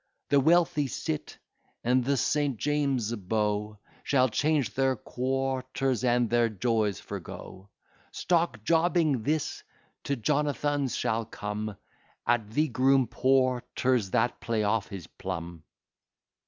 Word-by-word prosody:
The 140 Hz, -, +5 dB
wealthy 160 Hz, -1 st, +3 dB
cit, 155 Hz, +4 st, -4 dB, 0.5 s
and 125 Hz, +2 st, +3 dB
the 140 Hz, +2 st, +1 dB
St. 145 Hz, -2 st, +1 dB
James's 140 Hz, -5 st, 0 dB
beau, 105 Hz, +1 st, -1 dB, 0.3 s
Shall 130 Hz, -2 st, +3 dB
change 145 Hz, 0 st, +1 dB
their 135 Hz, 0 st, +2 dB
quarters, 130 Hz, 0 st, -2 dB
and 120 Hz, -1 st, +3 dB
their 120 Hz, +1 st, +2 dB
joys 110 Hz, -2 st, 0 dB
forego; 95 Hz, +1 st, -9 dB, 0.4 s
Stock 165 Hz, -11 st, 0 dB
jobbing, 165 Hz, -3 st, +2 dB
this 150 Hz, +4 st, -1 dB, 0.4 s
to 140 Hz, -, 0 dB
Jonathan's 145 Hz, +1 st, 0 dB
shall 115 Hz, -2 st, -1 dB
come, 105 Hz, -1 st, -5 dB, 0.5 s
At 120 Hz, -3 st, +1 dB
the 150 Hz, +8 st, +1 dB
Groom 130 Hz, +2 st, +3 dB
Porter's, 130 Hz, -3 st, +1 dB
that 120 Hz, +4 st, +1 dB
play 115 Hz, -2 st, -1 dB
off 105 Hz, 0 st, +1 dB
his 95 Hz, -5 st, -8 dB
plum. 85 Hz, -3 st, -6 dB
125 Hz, 115 wpm, -28 LUFS, 110-140 Hz, 0.5 s, The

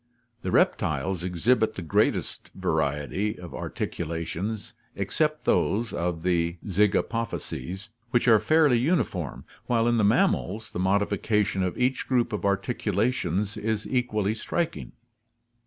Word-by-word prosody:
The -, -, -3 dB
reptiles 80 Hz, +5 st, +1 dB
exhibit 110 Hz, +6 st, +1 dB
the 95 Hz, -, -5 dB
greatest 80 Hz, -, 0 dB
variety 75 Hz, -, -1 dB
of 90 Hz, -1 st, -9 dB
articulations, 85 Hz, +6 st, -4 dB, 0.2 s
except 155 Hz, -1 st, -1 dB
those 115 Hz, +2 st, +1 dB
of 85 Hz, -1 st, -2 dB
the 85 Hz, -1 st, +1 dB
zygapophyses, 105 Hz, 0 st, -1 dB, 0.2 s
which 120 Hz, 0 st, +2 dB
are 110 Hz, -2 st, +7 dB
fairly 145 Hz, +1 st, +4 dB
uniform, 115 Hz, -, -1 dB, 0.2 s
while 115 Hz, -1 st, +2 dB
in 120 Hz, 0 st, +3 dB
the 110 Hz, -, +3 dB
mammals 110 Hz, -, +1 dB
the -, -, -4 dB
modification 100 Hz, +1 st, +1 dB
of 90 Hz, -1 st, -1 dB
each 125 Hz, +1 st, 0 dB
group 125 Hz, -4 st, +1 dB
of 105 Hz, -, -2 dB
articulations 100 Hz, 0 st, 0 dB
is 110 Hz, 0 st, -2 dB
equally 110 Hz, -5 st, 0 dB
striking. 170 Hz, +9 st, -3 dB
105 Hz, 120 wpm, -26 LUFS, 90-120 Hz, 0.2 s, are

